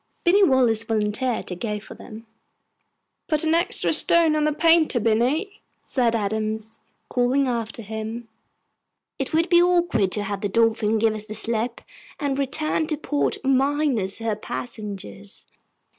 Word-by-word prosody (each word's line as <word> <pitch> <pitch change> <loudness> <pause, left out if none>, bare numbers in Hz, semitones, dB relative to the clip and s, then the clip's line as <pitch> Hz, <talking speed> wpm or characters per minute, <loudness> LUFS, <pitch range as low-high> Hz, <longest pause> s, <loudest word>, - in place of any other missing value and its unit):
Binny 390 +4 +5
Wallace 250 - +3
volunteered 220 +3 -1
to 180 - -5
go 210 +2 -3
for 210 - -12
them. 225 +1 -11 1.0
"Put 310 -1 +1
an 320 0 +2
extra 340 +3 +1
stone 330 -2 +3
on 305 -1 +1
the 305 - +2
painter, 325 -3 +3
Binny," 255 - 0 0.2
said 240 -3 0
Adams, 220 +1 -3 0.3
calling 260 +2 +1
after 230 -2 -3
him; 220 +2 -6 0.9
"it 270 - -3
would 330 +2 +2
be 345 -1 +5
awkward 345 - +2
to 210 - -2
have 200 -1 -4
the 205 - -1
Dolphin 225 0 +2
give 220 0 +2
us 215 0 -7
the 215 - -4
slip 230 +2 -1 0.4
and 280 -2 -1
return 305 +3 0
to 305 -2 -1
port 295 -1 -1
minus 270 -6 +1
her 225 -2 -2
passengers." 200 - -7
235 Hz, 145 wpm, -23 LUFS, 215-300 Hz, 1.0 s, Binny